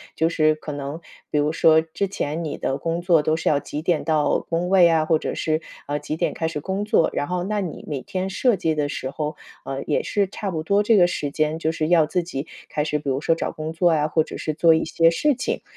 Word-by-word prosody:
就 160 - +2
是 155 -2 +2
可 155 0 -7
能 145 +3 -5 0.3
比 150 - -1
如 150 +2 +1
说 160 -1 +5
之 165 +4 -2
前 160 -3 -3
你 155 - -4
的 135 - -2
工 165 +3 -2
作 175 -3 +4
都 155 +1 +1
是 - - -4
要 145 -2 +3
几 150 +1 -6
点 170 -4 +1
到 155 -1 +2
工 170 +1 0
位 185 -3 +6
啊， 160 -1 +2
或 160 0 +3
者 - - -3
是， 155 0 0 0.3
呃， 145 - -1
几 155 - -4
点 - - 0
开 160 - -2
始 150 - -4
工 190 +6 -3
作， 215 -6 +3
然 145 - -1
后 180 0 -2
那 210 +1 -1
你 170 -5 -6
每 145 -4 -3
天 185 +8 -3
设 235 +3 +2
计 165 -3 0
的 145 -1 -1
时 130 -2 -4
候， 150 +1 -4 0.3
呃， 135 0 -4
也 150 - 0
是 200 -2 0
差 195 0 -5
不 160 -3 -3
多 200 +5 +2
这 220 0 +4
个 175 - +6
时 150 -4 -3
间 155 +1 0
就 160 -1 0
是 155 -1 -2
要 165 -3 +5
自 180 +2 0
己 160 -3 -5 0.2
开 150 - -1
始， 150 -1 -1
比 145 - -10
如 135 +2 -1
说 165 - +2
找 - - -3
工 155 0 -5
作 170 +1 +2
呀， 150 -1 +2
或 160 0 +2
者 - - -8
是 155 - -3
做 165 -1 +5
一 160 - +1
些 165 0 +3
事 290 - +2
情。 260 - -3
160 Hz, 285 characters per minute, -23 LUFS, 150-175 Hz, 0.3 s, 位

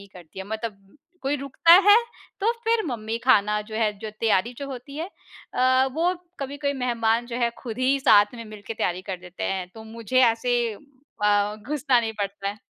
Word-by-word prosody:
ही 200 - -13
करती 175 0 -13
है। 190 - -5
मतलब 215 -1 -7 0.3
कोई 275 +2 0
रुकता 275 +4 +3 0.2
है 410 - +10 0.5
तो 435 +4 +3
फिर 455 -1 +2
मम्मी 225 -3 -3
खाना 210 -4 +4
जो 215 +1 -10
है, 220 -2 +1
जो 215 +1 -6
तैयारी 225 +1 +2
जो 280 - -5
होती 275 +2 -8
है 335 +4 -3 0.5
अ, 260 +1 +3
वो 350 +3 +1 0.3
कभी-कभी 280 +1 -2
मेहमान 235 -2 0
जो 240 0 -5
हैं 235 -1 +1
खुद 240 -1 -7
ही 265 +2 +2
साथ 205 -5 +5
में 230 -1 -8
मिलके 215 0 -8
तैयारी 180 -3 -2
कर 190 -1 -5
देते 180 0 -7
हैं। 185 -2 -2
तो 220 - -10
मुझे 230 +3 -1
ऐसे 240 +1 +2 0.7
अ, 205 0 +3
घुसना 260 +2 +1
नहीं 225 -1 -3
पड़ता 200 0 -3
है। 205 +2 -6
230 Hz, 195 wpm, -24 LUFS, 210-265 Hz, 0.7 s, है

